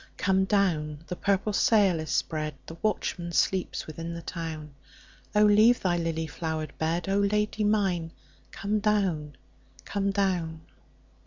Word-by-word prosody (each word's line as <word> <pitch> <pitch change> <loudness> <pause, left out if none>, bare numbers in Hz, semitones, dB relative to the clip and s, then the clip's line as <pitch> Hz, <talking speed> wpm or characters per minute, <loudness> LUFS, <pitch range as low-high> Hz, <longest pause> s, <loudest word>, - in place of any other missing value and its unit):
Come 190 0 +2
down! 160 -7 +1
the 180 - -5
purple 200 +2 0
sail 200 -5 +4
is 155 -1 -5
spread, 155 +3 -1
The 165 - -9
watchman 175 -5 -1
sleeps 185 +2 0
within 165 +2 -6
the 170 - -7
town,O 155 +5 -4
leave 215 +4 +6
thy 180 -2 +1
lily 165 -1 -1
flowered 160 0 -4
bed,O 170 +5 0
Lady 210 +1 +1
mine 190 -6 +1 0.4
come 210 +2 -1
down, 185 -9 0 0.5
come 200 -1 -1
down! 180 -5 -1
175 Hz, 130 wpm, -27 LUFS, 160-200 Hz, 0.5 s, leave